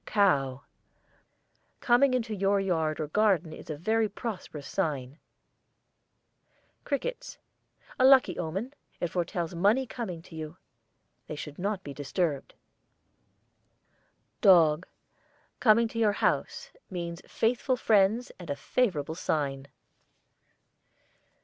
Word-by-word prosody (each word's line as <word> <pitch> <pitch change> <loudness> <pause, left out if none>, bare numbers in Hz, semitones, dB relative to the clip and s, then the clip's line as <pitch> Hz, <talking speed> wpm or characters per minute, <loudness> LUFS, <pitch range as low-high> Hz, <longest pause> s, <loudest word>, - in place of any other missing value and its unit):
COW. 140 - +2 1.2
Coming 255 +2 +4
in 250 - +1
your 200 -2 0
yard 160 -5 0
or 155 - -1
garden 185 -1 +1
a 155 - -7
very 220 +7 +1
prosperous 185 - -6
sign. 145 -6 -2 1.7
CRICKETS. 485 - -3 0.6
A 255 - +5
lucky 260 -9 +5
omen. 195 - -3 0.3
It 175 - -1
foretells 175 -1 -2
money 205 +10 +2
coming 195 -9 -6
to 170 - -13
you. 155 +2 -7 0.7
They 155 - -5
should 150 +1 -8
not 200 +1 -2
be 140 - -7
disturbed. 145 +1 -2 1.9
DOG. 170 -3 +5 0.7
Coming 230 0 +5
to 230 - -5
your 215 -2 +3
house, - - -1 0.2
means 170 -2 -5
faithful 250 +3 0
friends 220 +2 +2
and 175 - -10
a 145 - -1
favourable 160 - -1
sign. 140 -5 -2
185 Hz, 105 wpm, -28 LUFS, 155-220 Hz, 1.9 s, A